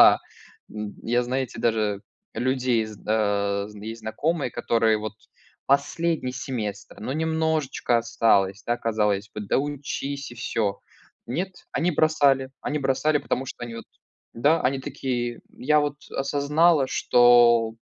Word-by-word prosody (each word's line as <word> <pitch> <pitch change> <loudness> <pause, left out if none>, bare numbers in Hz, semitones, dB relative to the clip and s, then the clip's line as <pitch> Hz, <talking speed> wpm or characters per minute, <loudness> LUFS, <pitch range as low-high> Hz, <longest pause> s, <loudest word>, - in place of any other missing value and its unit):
Да. - - +8 0.5
М, 105 -1 -6
я, 120 +2 +1
знаете, 125 -1 -3
даже 110 -3 +1 0.3
людей 125 -3 +1
зд 105 -2 -11
э, 100 -2 +1
з 105 - -13
есть 110 +2 -7
знакомые, 145 +6 -1
которые 115 -2 +2
вот 110 -1 -5 0.5
последний 140 0 +1
семестр, 115 -8 -5
но 125 +5 -3
немножечко 160 -6 0
осталось 105 -3 +2
да, 120 0 +1
казалось 105 -3 0
бы, 105 - -4
доучись 140 +3 -3
и - - -10
всё. 110 -4 -2 0.5
Нет, 175 +10 -2 0.2
они 175 +2 +1
бросали 140 -4 +3
они 150 - -1
бросали, 140 +2 +1
потому 130 -1 -2
что 120 - -8
они 115 -1 -7
вот 115 - -8 0.5
да, 145 +8 +3
они 135 +1 +1
такие: 120 -3 -3
"Я 150 +3 +2
вот 145 -1 -1
осознала, 145 +2 +2
что 120 -2 +5
125 Hz, 135 wpm, -25 LUFS, 110-140 Hz, 0.5 s, Да